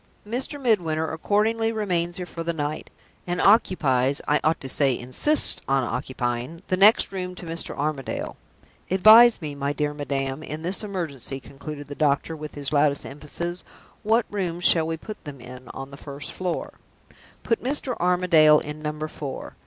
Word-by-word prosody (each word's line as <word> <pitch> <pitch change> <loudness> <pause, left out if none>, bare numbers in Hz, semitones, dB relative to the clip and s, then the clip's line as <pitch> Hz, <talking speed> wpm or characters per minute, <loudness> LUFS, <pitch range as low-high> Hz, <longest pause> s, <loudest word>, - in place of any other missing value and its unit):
Mr. 260 +6 -2
Midwinter 170 - +1
accordingly 220 +6 +1
remains 175 -6 -1
here 180 - -4
for 170 - -8
the 165 0 -1
night; 150 -1 -4 0.4
and 175 0 -2
occupies 140 - +3
(I 150 - +3
ought 155 +2 +2
to 135 - -4
say, 135 -1 +3
insists 130 - +3
on 135 -1 +2
occupying) 125 +5 -3
the 185 - +2
next 205 +5 +5
room 180 -1 -5
to 180 - -9
Mr. 165 0 -3
Armadale. 145 -2 -3 0.5
Advise 215 +3 +7
me, 150 -1 -4
my 140 0 -2
dear 150 0 -1
madam, 135 -1 -3
in 155 +1 -6
this 185 +5 -2
emergency," 160 - -4
concluded 145 +2 -9
the 145 - -6
doctor, 145 +2 0
with 150 -1 -8
his 140 -1 -4
loudest 145 -1 +2
emphasis. 170 +5 -5 0.4
"What 225 +2 +2
rooms 180 -4 -3
shall 160 -2 +5
we 165 0 -2
put 215 +6 -9
them 145 -3 -9
in, 125 +1 -11
on 135 +3 -8
the 140 - -10
first 140 0 -7
floor?" 180 -2 -4 0.6
"Put 230 - 0
Mr. 265 -1 -1
Armadale 175 -4 +5
in 150 +1 -7
Number 150 0 -4
Four." 145 -3 -7
155 Hz, 170 wpm, -24 LUFS, 140-185 Hz, 0.6 s, Advise